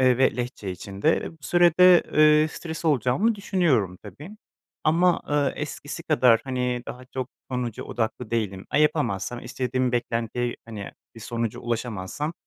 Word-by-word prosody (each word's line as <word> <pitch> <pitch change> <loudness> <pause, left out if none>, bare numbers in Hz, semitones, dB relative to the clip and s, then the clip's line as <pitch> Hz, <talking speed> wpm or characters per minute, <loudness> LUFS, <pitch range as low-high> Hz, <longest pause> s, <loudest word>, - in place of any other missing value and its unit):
Eee, 130 -1 +4
ve 130 - +3
Lehçe 120 -5 -4
için 95 +2 -8
de. 160 - +4
Eee, - - -6
bu 165 - -18
sürede, 175 +3 +6
eee, 155 0 +5
stres 160 +1 -7
olacağımı 155 - +2
düşünüyorum 160 - +1
tabii 110 - -10 0.5
ama, 175 +3 +3
ııı, 145 -2 +1
eskisi 150 +2 -6
kadar, 125 -8 +4
hani, 125 -2 -2
daha 125 +1 -8
çok 130 0 -5 0.2
sonuca 125 -3 -3
odaklı 115 0 -3
değilim. 105 -5 -2
A, - - +2
yapamazsam, 130 - 0
istediğim 125 +1 -1
beklentiye, 120 0 -1
hani, 110 -3 -7 0.2
bir 115 - -12
sonuca 115 -1 -3
ulaşamazsam, 120 - -3
125 Hz, 150 wpm, -25 LUFS, 115-155 Hz, 0.5 s, sürede